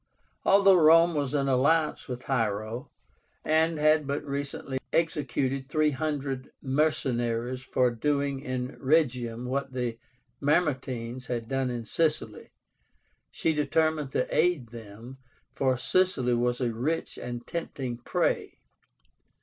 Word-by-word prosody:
Although 195 -1 +6
Rome 165 +2 +6
was 145 -2 -1
in 140 -1 +1
alliance 150 +4 +2
with 125 -1 -6
Hiero, 115 +1 -2 0.6
and 160 +1 +2
had 155 -1 +3
but 140 +1 -2
recently 140 -1 -4
executed 135 -4 -1
300 145 -3 -1
mercenaries 125 -4 0
for 125 -1 +1
doing 140 +3 0
in 130 0 -4
Rhegium 125 -5 +1
what 135 +1 -2
the 120 -2 -3 0.4
Mamertines 130 -5 0
had 120 -2 -3
done 135 0 -1
in 120 -2 -4
Sicily, 155 +5 -1 0.8
she 160 - 0
determined 155 -1 +1
to - - +1
aid 165 -10 +2
them, 115 +3 -11 0.3
for 130 -2 +1
Sicily 135 -6 +2
was 120 +1 0
a 120 -2 0
rich 145 +9 -2
and 120 -1 -6
tempting 135 -8 -4
prey. 120 - -1
135 Hz, 115 wpm, -28 LUFS, 125-150 Hz, 0.8 s, Although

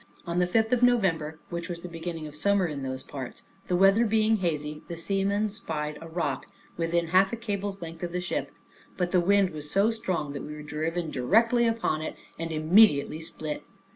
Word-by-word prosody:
On 170 0 -1
the 180 - +3
fifth 220 +4 +2
of 250 - +2
November, 180 -11 +2
which 170 0 -4
was 170 -1 -5
the 180 - -6
beginning 165 -1 -5
of 150 -1 -8
summer 200 +4 +2
in 150 -4 -4
those 130 0 -4
parts, 130 -4 -7 0.2
the 180 - +1
weather 195 +5 +5
being 220 0 +3
very 185 -5 +1
hazy, 150 0 -6
the 170 - -6
seamen 200 +4 +1
spied 150 -7 -4
a 165 - -8
rock, 160 -5 -2 0.3
within 170 0 0
half 190 +3 +4
a - - -1
cable's 200 -4 -4
length 165 0 -8
of 175 -1 -3
the 180 - -1
ship; 180 0 -3 0.5
but 180 -2 0
the 180 - +4
wind 195 +1 +3
was 150 -1 -6
so 200 +7 +3
strong 175 -10 -2
that 140 - -5
we 150 - -7
were 150 - -8
driven 160 +2 -2
directly 230 - +3
upon 225 -9 0
it, 155 - -4 0.2
and 165 0 -3
immediately 155 -1 +4
split. 155 -2 -5
170 Hz, 205 wpm, -27 LUFS, 155-200 Hz, 0.5 s, weather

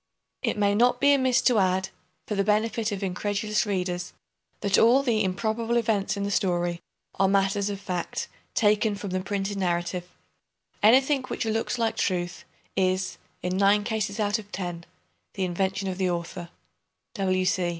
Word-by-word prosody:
It - - -1
may 205 -1 +3
not 245 +4 +3
be 285 0 +5
amiss 260 -2 +3
to 245 -4 +4
add, 190 0 +1 0.4
for - - -3
the 200 -1 +1
benefit 215 +2 +1
of 200 0 -4
incredulous 205 +3 -1
readers, 180 -3 -2 0.5
that 200 -2 +3
all 245 +5 +5
the 225 -5 +2
"improbable 220 +5 0
events" 215 -4 0
in 200 - -2
the 200 - -2
story 175 -3 0 0.4
are 195 - +5
matters 195 +1 +2
of 200 -1 -4
fact, 180 -3 -3 0.3
taken 210 -1 +3
from 200 -1 -6
the 185 - 0
printed 195 +1 -3
narrative. 175 0 -1 0.7
Anything 265 +6 +5
which - - -3
"looks 225 +2 -1
like 230 -1 0
truth" 175 -2 -1 0.3
is, 185 0 0 0.2
in 180 +1 -1
nine 200 +1 +4
cases 215 -2 -2
out 210 +1 +1
of 205 -1 -12
ten, 175 -3 -5 0.5
the 190 - 0
invention 190 +2 -1
of 185 0 -4
the 185 -1 +1
author. 170 0 -4
200 Hz, 160 wpm, -26 LUFS, 185-220 Hz, 0.7 s, be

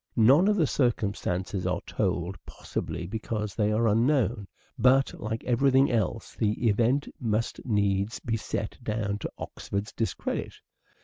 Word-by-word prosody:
None 135 - +6
of 210 - +4
the 170 -6 +3
circumstances 100 -7 -1
are 90 -1 -1
told, 90 -2 -1
possibly 85 - -5
because 105 +1 -3
they 105 -1 +1
are 115 +2 +2
unknown, 115 -2 +2 0.3
but, 130 +3 +4
like 110 +1 -3
every 125 +3 +3
thing 135 +1 +4
else, 115 -1 -1
the 110 +2 0
event 120 +6 +2
must 115 -2 -1
needs 100 -1 +1
be 115 - -2
set 110 -1 -4
down 105 -2 -2
to - - -5
Oxford's 100 +2 -5
discredit 115 - -3
110 Hz, 140 wpm, -28 LUFS, 100-120 Hz, 0.3 s, None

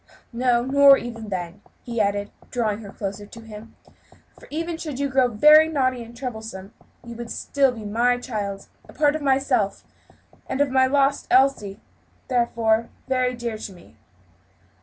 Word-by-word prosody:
No, 240 0 +1
nor 275 +1 +7
even 230 -3 -7
then," 180 -2 -5 0.2
he 235 -2 -2
added, 205 0 -1 0.2
drawing 220 -4 -1
her 205 -3 -10
closer 200 0 -6
to 230 - -12
him, 220 0 -12 0.6
"for - - -15
even 330 +2 -3
should 310 -5 -6
you 280 +1 0
grow 260 -2 +3
very 300 +8 +6
naughty 255 -5 0
and 235 +1 -13
troublesome, 220 -6 -7 0.3
you 235 0 -8
would 235 0 -7
still 275 -2 +1
be 225 -3 -9
my 240 +4 +1
child 205 -5 -5 0.2
a - - -13
part 295 0 +2
of 310 - -4
myself 265 -7 +1 0.6
and 265 - -3
of 285 -2 +2
my 260 0 +4
lost 275 +1 +1
Elsie, 255 -6 +3
and 205 - -23 0.5
therefore 230 -2 +1 0.2
very 255 -1 0
dear 235 -2 -5
to 200 - -7
me." 175 -8 -18
240 Hz, 165 wpm, -23 LUFS, 215-270 Hz, 0.6 s, nor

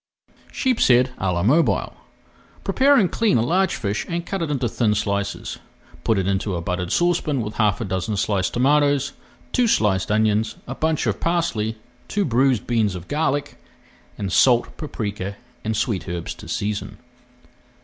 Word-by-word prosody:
SHEEPSHEAD 130 - +3
À 95 -1 0
LA 85 0 0
MOBILE 150 +10 +2 0.7
Prepare 280 +2 +4
and 195 -8 +3
clean 225 - +2
a 115 - +2
large 185 +8 +1
fish 105 -2 -2
and 170 0 -2
cut 195 +1 -3
it 165 - -1
into 135 -4 0
thin 115 -2 +1
slices. 100 -1 -2 0.4
Put 115 - +2
into 95 +1 0
a - - -2
buttered 90 +1 -3
saucepan 165 -6 +1
with 105 0 -5
half 105 -3 +2
a - - -1
dozen 95 +3 -2
sliced 95 -2 0
tomatoes, 140 +2 +2 0.4
two 245 -1 +2
sliced 105 - +2
onions, 110 +1 +2
a 125 - -5
bunch 160 +1 0
of 105 -4 -1
parsley, 165 -11 0 0.3
two 205 -1 0
bruised 130 -2 +2
beans 110 -5 +1
of 90 -1 -8
garlic, 145 -1 -1 0.6
and 100 - -3
[Page - - +4
361] - - +8
salt, 120 -2 +2
paprika, 105 -9 -4 0.3
and 110 -1 -1
sweet 105 -5 -1
herbs 85 -1 -4
to - - -12
season. 105 +1 -3
115 Hz, 165 wpm, -22 LUFS, 100-150 Hz, 0.7 s, 361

